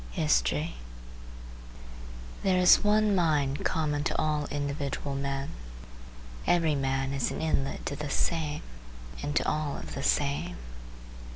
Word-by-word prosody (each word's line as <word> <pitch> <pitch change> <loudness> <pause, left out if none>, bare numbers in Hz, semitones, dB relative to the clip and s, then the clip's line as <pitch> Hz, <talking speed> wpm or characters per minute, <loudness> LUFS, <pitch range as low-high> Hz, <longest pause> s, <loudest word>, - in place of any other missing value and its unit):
HISTORY 60 +8 +1 1.7
There 190 -1 +2
is 180 -1 +7
one 210 0 +3
mind 150 -6 +1
common 150 -2 0
to - - 0
all 150 -1 0
individual 140 0 -3
men. 140 0 -2 1.0
Every 165 -3 +3
man 135 -1 0
is 135 -2 0
an - - -4
inlet 150 -4 -1
to 140 - -2
the 150 0 -5
same 155 -1 -1 0.6
and 145 +1 -3
to - - +2
all 150 -2 -1
of - - -8
the - - -4
same. 70 +5 0
145 Hz, 125 wpm, -29 LUFS, 135-155 Hz, 1.7 s, is